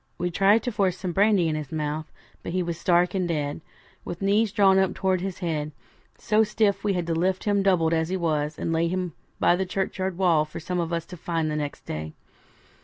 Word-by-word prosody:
We 175 0 -2
tried 200 +5 +4
to 245 - -2
force 190 -4 0
some 185 -2 -3
brandy 195 -1 +3
in 160 - 0
his 155 -3 -5
mouth, 155 0 -3 0.3
but - - -6
he 185 0 +1
was 170 -1 -3
stark 175 0 +3
and 185 -2 0
dead; 150 -2 -2 0.4
with 175 - -6
knees 205 +2 +2
drawn 195 -1 +5
up 190 -1 +1
towards 190 -2 0
his 190 -1 -4
head, 150 -2 -2 0.4
so 215 0 +2
stiff 210 -1 +1
we 205 -1 +1
had 175 -2 -1
to 165 - -1
lift 185 +3 0
him 205 -1 +2
doubled 175 -4 +3
as 160 0 0
he 190 - -1
was, 155 -3 -1
and 165 - -2
lay 165 +1 +2
him 180 -1 -2 0.3
by 175 - +4
the 190 - 0
churchyard 190 -1 -2
wall 170 -5 +3
for 155 +2 -8
some 180 +2 -3
of 170 -1 -2
us 170 -1 -2
to 180 - -10
find 165 -1 -1
next 150 -1 -3
day. 80 0 -5
175 Hz, 225 wpm, -25 LUFS, 160-190 Hz, 0.4 s, drawn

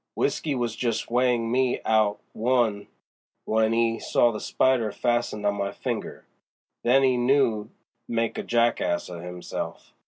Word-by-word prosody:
W'isky 145 -4 0
was 120 -2 -2
just 115 -2 -2
weighin' 120 -2 +2
me 130 0 +1
out 110 -2 +2
one 115 -4 +1 0.6
w'en 110 0 +2
'e 115 0 +1
saw 120 - +2
the 105 - -5
spider 125 -5 +1
fastened 120 -2 -1
on 100 - +3
my 100 -1 -2
finger; - - -5 0.6
then 130 +3 +4
'e 130 -2 +3
knew 120 -4 +2 0.4
he'd - - -6
made 115 0 0
a - - 0
jack 120 0 +1
ass 85 - -1
of 85 -1 -8
'imself. 90 0 -6
115 Hz, 155 wpm, -25 LUFS, 105-125 Hz, 0.6 s, then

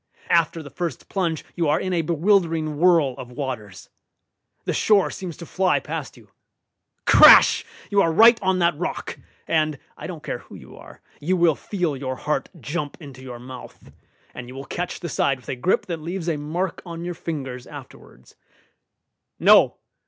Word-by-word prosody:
After 165 -1 +2
the 145 - -11
first 170 -8 -5
plunge 170 -5 -2
you 170 -4 0
are 150 - +2
in 185 - -2
a 170 - +2
bewildering 165 -2 +1
whirl 165 -6 +4
of 125 - -8
waters. 125 -7 -6 0.8
The - - -1
shore 205 -3 +3
seems 180 -4 -7
to 170 - -9
fly 185 +2 +1
past - - -6
you. - - -19 0.7
Crash! - - +8 0.3
You 200 -1 +4
are 165 - +2
right 225 +6 +6
on 190 -1 +1
that 170 -2 +2
rock, 180 - -4 0.3
and 155 -2 +1 0.2
(I - - -8
don't - - -8
care - - -4
who - - -14
you - - -13
are) - - -14 0.2
you 180 +5 0
will 170 -2 +4
feel 175 -1 -3
your 130 -1 -4
heart 150 +4 -2
jump 145 0 -4
into 140 -5 -11
your 125 -2 -8
mouth, 125 +1 -12 0.4
and 120 - -8
you 130 - -10
will 135 +1 -7
catch 175 +4 -5
the 175 - -4
side 140 -3 0
with 125 - -15
a - - -2
grip 130 +10 0
that 170 -3 -5
leaves 175 +2 -5
a 165 - +1
mark 165 +5 -3
on 170 -1 -7
your 175 - -3
fingers 135 -7 -6
afterwards. - - -13 1.1
No! - - +6
165 Hz, 180 wpm, -23 LUFS, 140-180 Hz, 1.1 s, Crash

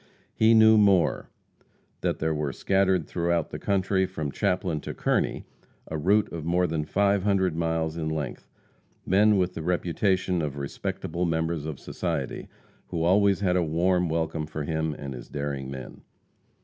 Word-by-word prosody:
He 110 +1 +4
knew 110 0 +7
more 100 -4 +3 0.7
that - - -1
there 80 0 0
were 75 -2 -2
scattered 95 +3 +1
through 85 +2 -2 0.2
the - - -5
country 95 -1 +1
from 80 -6 -4
Chaplin 90 -2 -1
to - - -6
Kearney, - - 0 0.4
a 80 - -4
route 100 +7 +2
of 80 -2 -5
more 90 +3 +2
than 80 -3 -2
five 100 +4 +2
hundred 95 -4 +1
miles 80 -1 -1
in 80 -1 -2
length, 80 -2 -4 0.6
men 105 +2 +4
with 90 -1 0
the - - -5
reputation 90 +1 0
of 70 -2 -3
respectable 70 +5 -3
members 80 -1 -1
of 75 -4 -6
society, 80 -7 -4 0.4
who 85 -2 -2
always 100 +3 +3
had 90 -3 +2
a 90 - +3
warm 85 +2 +1
welcome 80 -1 -2
for 75 -1 -5
him 80 0 -2
and 70 -2 -6
his - - -9
daring 70 -2 -4
men. 65 -2 -8
85 Hz, 160 wpm, -26 LUFS, 80-95 Hz, 0.7 s, knew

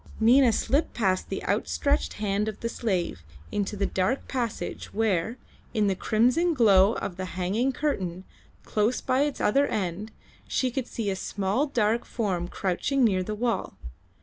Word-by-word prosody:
Nina 240 +2 +6
slipped 270 +7 0
past 190 -5 0
the - - -4
outstretched 285 +1 0
hand 210 0 -1
of 215 -2 -5
the 230 - -1
slave 185 - -2 0.3
into 205 0 -2
the 200 - +1
dark 190 +8 -1
passage 240 -5 -4
where, 220 0 0 0.4
in 215 -1 +3
the 195 -1 +1
crimson 250 - +2
glow 205 -4 +5
of 180 - -4
the 185 - -3
hanging 205 +9 +1
curtain, 190 - -2 0.4
close 215 +4 +1
by 260 +1 +1
its 290 -1 0
other 275 +7 +3
end, 200 +2 -3 0.4
she 255 -1 0
could 255 0 -3
see 210 -4 -2
a - - -2
small 200 +9 -1
dark 235 -3 +1
form 185 -7 -2
crouching 195 +10 0
near 195 -5 +3
the 210 +3 -3
wall. 230 - -2
215 Hz, 160 wpm, -27 LUFS, 190-250 Hz, 0.4 s, Nina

